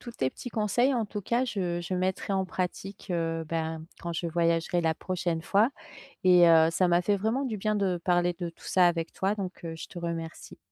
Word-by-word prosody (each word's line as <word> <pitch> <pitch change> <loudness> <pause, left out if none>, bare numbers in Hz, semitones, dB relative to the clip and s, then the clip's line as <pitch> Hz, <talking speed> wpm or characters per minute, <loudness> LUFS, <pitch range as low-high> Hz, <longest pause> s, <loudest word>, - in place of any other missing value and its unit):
tous 240 - -8
tes 130 - -1
petits 245 - -8
conseils 230 +5 +2
en 235 -4 0
tout 205 - -5
cas 240 +6 +1
je 180 -7 -2
je 175 +2 -3
mettrai 185 +2 -1
en 190 -1 +1
pratique, 185 +1 -4
heu, 165 -1 -1
ben, 160 -1 -3 0.2
quand 170 0 -4
je 170 +1 -2
voyagerai 170 +1 +1
la 160 -1 +2
prochaine 175 -1 -2
fois, 205 +7 +3 0.6
et 180 -2 +7
heu, 160 -1 +7
ça 185 +1 +2
m'a 175 0 +4
fait 200 +3 +1
vraiment 225 +7 0
du 225 -5 -2
bien 215 +2 0
de 190 -3 0
parler 175 -1 +2
de 175 -1 -2
tout 165 - -20
ça 180 -1 +4
avec 165 -1 -2
toi, 195 +3 -1
donc, 190 -3 -6
heu, 165 -1 -5
je 160 - -7
te 175 - -9
remercie. 165 -1 -5
180 Hz, 225 wpm, -28 LUFS, 170-200 Hz, 0.6 s, et